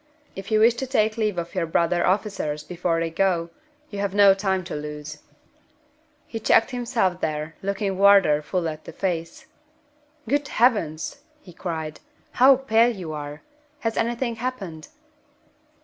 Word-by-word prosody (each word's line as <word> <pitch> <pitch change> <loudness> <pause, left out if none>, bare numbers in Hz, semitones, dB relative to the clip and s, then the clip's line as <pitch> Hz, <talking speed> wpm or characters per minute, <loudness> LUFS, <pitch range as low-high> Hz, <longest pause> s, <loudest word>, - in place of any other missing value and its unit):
If 195 0 -7
you 215 -1 +3
wish 230 +2 +6
to 265 - -3
take 215 -4 +1
leave 215 -4 -1
of 170 0 -4
your 180 -3 -1
brother 170 +2 +1
officers 185 -6 -1
before 170 0 -1
they 165 0 -2
go, 170 -1 0 0.4
you 205 - -5
have 200 -1 -2
no 200 -1 +7
time 190 -1 -1
to 175 - -6
lose." 150 0 -7 1.1
He 225 - -6
checked 225 +2 +3
himself 235 -7 -1
there, 155 +1 -2
looking 195 -1 -2
Wardour 195 -7 +6
full 175 +3 -2
in 155 -1 -3
the - - -10
face. 170 -3 -3 0.8
"Good 285 +3 0
Heavens!" 205 -10 +1 0.2
he 180 -11 -15
cried, 160 -3 -5 0.3
"how 265 +2 +6
pale 235 -3 +3
you 170 -5 -6
are! 145 0 -7 0.4
Has 225 -1 -1
anything 235 0 -1
happened?" 205 -10 -5
190 Hz, 150 wpm, -24 LUFS, 165-220 Hz, 1.1 s, no